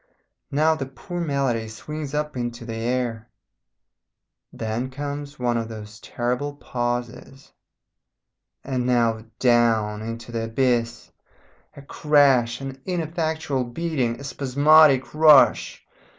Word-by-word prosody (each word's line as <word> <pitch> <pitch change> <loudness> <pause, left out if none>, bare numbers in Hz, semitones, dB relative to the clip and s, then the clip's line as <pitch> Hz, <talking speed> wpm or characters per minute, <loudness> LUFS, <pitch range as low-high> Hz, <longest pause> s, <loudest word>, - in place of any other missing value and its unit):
Now 155 +3 +3
the 135 -4 -4
poor 175 +6 -7
melody 135 -8 -1
swings 150 +6 -7
up 150 -1 -2
into 120 -1 -4
the 115 - -5
air 115 0 -2 1.2
then 115 +3 -3
comes 145 +1 -6
one 120 -1 0
of 115 -1 -3
those 110 -1 -10
terrible 125 +4 -3
pauses, 120 +1 -5 1.1
and 130 -2 -2
now 115 -2 +1
down 115 -4 +2
into 115 +1 -7
the 115 -1 -2
abyss. 120 0 -1 0.7
A 140 - -10
crash, 140 -5 +2
an 135 0 -7
ineffectual 160 -5 -2
beating, 125 -2 -2
a - - -9
spasmodic 140 +1 +4
rush. 155 -2 +5
130 Hz, 110 wpm, -23 LUFS, 115-145 Hz, 1.2 s, rush